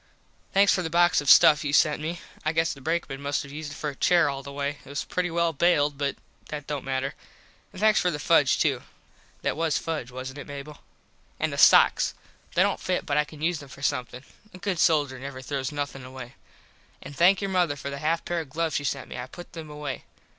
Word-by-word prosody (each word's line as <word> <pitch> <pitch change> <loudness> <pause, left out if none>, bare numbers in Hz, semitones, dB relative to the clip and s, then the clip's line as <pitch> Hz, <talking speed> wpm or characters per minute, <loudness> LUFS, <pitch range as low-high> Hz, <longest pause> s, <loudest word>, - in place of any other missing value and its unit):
Thanks 200 +1 +5
for 185 - +1
the 165 - -3
box 175 -1 +4
of 145 - -1
stuff 150 +1 +7
you 145 -1 -2
sent 150 0 +3
me. 170 +2 -4 0.2
I 155 - 0
guess 160 +1 +1
the 140 - -13
brakeman 160 -2 -2
must 140 +1 -1
have 140 - -11
used 150 0 -6
it - - -10
for 150 - -3
a - - -14
chair 170 +1 +3
all 135 0 -5
the 140 - -9
way. 145 +1 -3
It - - -15
was 140 +1 -3
pretty 180 -1 -2
well 170 0 +1
baled 145 -2 +2
but 140 -1 -1 0.3
that 150 -2 -5
dont 145 -3 -4
matter. 135 +1 -2 0.6
And 185 - -11
thanks 215 +1 +4
for 180 - +2
the 160 - -2
fudge 145 - +3
too. - - +1 0.6
That - - 0
was 160 -1 0
fudge 155 -7 -4
wasnt 130 +2 -7
it, - - -8
Mable? 145 +1 -8 0.6
And - - -1
the - - -5
sox. - - +6 0.4
They - - +5
dont - - 0
fit - - -1
but 145 - -1
I 150 - +3
can 150 0 -11
use 170 -1 +1
them 140 - -12
for 135 0 -12
somethin. 125 -2 -2 0.3
A - - -9
good 185 -2 -2
soldier 145 -6 +2
never 135 0 -7
throws 135 +1 -3
nothin 145 -2 -4
away. 130 -1 -9 0.7
An 145 - -9
thank 180 +5 +4
your 195 -1 -3
mother 175 -5 +2
for 140 0 -6
the 140 - -5
half 160 +3 0
pair 175 -1 -1
of 160 -4 -6
gloves 160 +2 -1
she 145 - -3
sent 140 - -3
me. - - -7
I 125 - -5
put 175 +6 -12
them 160 -2 -8
away. 150 -2 -6
150 Hz, 240 wpm, -26 LUFS, 140-165 Hz, 0.7 s, stuff